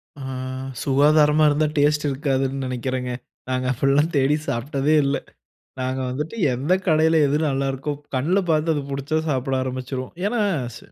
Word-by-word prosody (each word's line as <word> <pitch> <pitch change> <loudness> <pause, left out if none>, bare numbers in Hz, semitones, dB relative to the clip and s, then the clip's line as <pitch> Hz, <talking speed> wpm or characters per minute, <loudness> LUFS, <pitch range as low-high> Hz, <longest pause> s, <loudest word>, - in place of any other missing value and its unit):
அ 145 - -11 0.6
சுகாதாரமா 150 +2 +4
இருந்தா 150 +1 +2
டேஸ்ட் 150 +1 +3
இருக்காதுன்னு 135 -1 -1
நினைக்கறேங்க. 125 0 -3 0.4
நாங்க 130 0 -1
அப்படியெல்லாம் 140 +5 +2
தேடி 140 +2 +3
சாப்பிட்டதே 140 +5 0
இல்ல. 140 0 +1 0.6
நாங்க 130 +1 -2
வந்துட்டு 150 - -4 0.2
எந்த 140 +8 -1
கடையில 160 0 +4
எது 140 +1 +1
நல்லாயிருக்கோ 135 +1 -1 0.2
கண்ல 155 +9 +2
பார்த்து 160 +1 +2
அது 145 - -2
புடிச்சா 140 +3 -2
சாப்பிட 135 -1 -1
ஆரம்பிச்சுருவோம். 130 0 -4
ஏன்னா, 235 +2 0 0.4
ச - - -7
140 Hz, 135 wpm, -22 LUFS, 130-150 Hz, 0.6 s, சுகாதாரமா